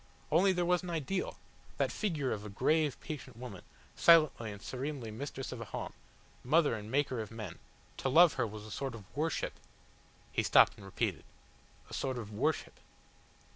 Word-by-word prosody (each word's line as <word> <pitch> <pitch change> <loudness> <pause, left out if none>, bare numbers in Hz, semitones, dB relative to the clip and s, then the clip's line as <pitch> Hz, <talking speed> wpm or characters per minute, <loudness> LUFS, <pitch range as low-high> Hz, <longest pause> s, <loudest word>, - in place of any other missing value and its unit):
Only 180 +5 +5
there 180 -1 +1
was 180 0 +3
an 180 - -6
ideal 170 +3 -2 0.4
that - - +1
figure 155 -11 -1
of 105 - -3
a 105 - -6
grave, 150 +8 +1
patient 150 -6 -7
woman, 115 -7 -8 0.3
silently 155 -9 +5
and 100 - -8
serenely 130 0 -4
mistress 135 +3 -5
of 125 - -6
a - - -5
home, - - -5 0.5
mother 150 +3 +4
and 105 -1 -5
maker 130 -2 +1
of 110 - -6
men 110 -7 -7 0.4
to 135 - -1
love 165 +4 +7
her 120 -3 0
was 105 0 -8
a 110 - -10
sort 135 0 -3
of 105 -4 -10
worship 155 +2 -1 0.4
" - - -30 0.3
He - - +1
stopped - - +6
and 100 - -11
repeated, 95 - -2 0.6
"A - - -12
sort 130 -2 -1
of 110 -3 -6
worship." 150 +9 -1
130 Hz, 180 wpm, -33 LUFS, 110-160 Hz, 0.6 s, love